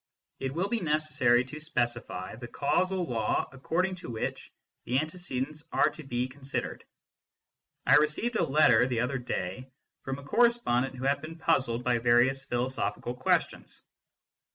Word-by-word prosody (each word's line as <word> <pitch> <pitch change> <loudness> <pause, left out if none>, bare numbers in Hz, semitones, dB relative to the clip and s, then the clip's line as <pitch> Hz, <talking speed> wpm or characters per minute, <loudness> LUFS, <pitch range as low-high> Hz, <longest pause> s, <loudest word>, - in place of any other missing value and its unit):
It 135 +1 -3
will 180 +4 0
be 235 +2 0
necessary 150 - +2
to 150 +4 -8
specify 120 - -2
the 120 +1 -8
causal 185 +8 0
law 115 -6 0
according 170 +8 -1
to 170 - -8
which 110 -2 -4 0.3
the 125 - 0
antecedents 155 -2 -3
are - - +3
to - - -10
be 125 -2 -1
con 135 +2 -16
sidered. 135 +1 -3 1.0
I - - +7
received 150 +11 +1
a - - +2
letter 125 -4 +5
the 120 -3 0
other 130 +2 -1
day 120 +1 -4 0.3
from 135 0 -4
a 140 - -10
corre 235 - +5
spondent 135 - -1
who 130 - -7
had 140 +1 +1
been 160 +2 -8
puzzled 130 -8 +1
by 125 -2 +2
various 120 +3 +3
philosophical 120 -3 -2
questions. 125 +1 -1
135 Hz, 155 wpm, -29 LUFS, 120-155 Hz, 1.0 s, I